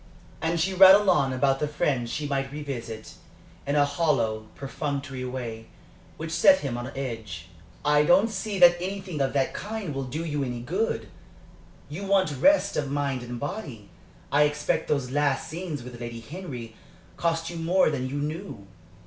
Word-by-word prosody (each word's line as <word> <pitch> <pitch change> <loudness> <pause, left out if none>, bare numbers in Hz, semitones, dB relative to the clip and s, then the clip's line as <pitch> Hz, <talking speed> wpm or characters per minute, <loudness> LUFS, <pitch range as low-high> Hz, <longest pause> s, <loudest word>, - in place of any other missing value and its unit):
And 165 +1 0
she 190 +4 +1
rattled 190 +2 +8
on 140 -7 +3
about 135 +1 +1
the 150 - 0
friends 140 -6 -1
she 145 +4 -3
might 135 -1 -2
revisit, 125 -7 -6 0.5
in 140 - +1
a 145 -1 +5
hollow, 140 -8 0
perfunctory 140 -1 -4
way, 120 -3 -5 0.5
which 160 0 -5
set 280 - +5
him 130 -4 -3
on 120 +1 -4
edge. 110 -11 -5 0.4
"I 150 0 +5
don't 185 +7 +5
see 205 0 -3
that 175 -1 +7
anything 190 -4 -4
of 135 - 0
that 135 -2 +1
kind 210 -7 -4
will 135 -1 -3
do 155 +6 -4
you 145 -3 -1
any 125 -2 -4
good. 185 - -1 0.8
You 155 +8 -6
want 190 -6 +2
rest 295 - +4
of 145 -2 -1
mind 140 -2 -1
and 120 0 -6
body. 140 - -6 0.4
I 150 +1 +5
expect 150 0 -1
those 135 -4 -1
last 145 -1 +1
scenes 160 -5 -5
with 120 -1 -10
Lady 120 -1 -6
Henry 125 -5 -8 0.4
cost 165 0 -1
you 170 - -6
more 165 +1 +3
than 130 -3 -2
you 140 - -5
knew. 150 - -4
145 Hz, 170 wpm, -26 LUFS, 130-170 Hz, 0.8 s, rattled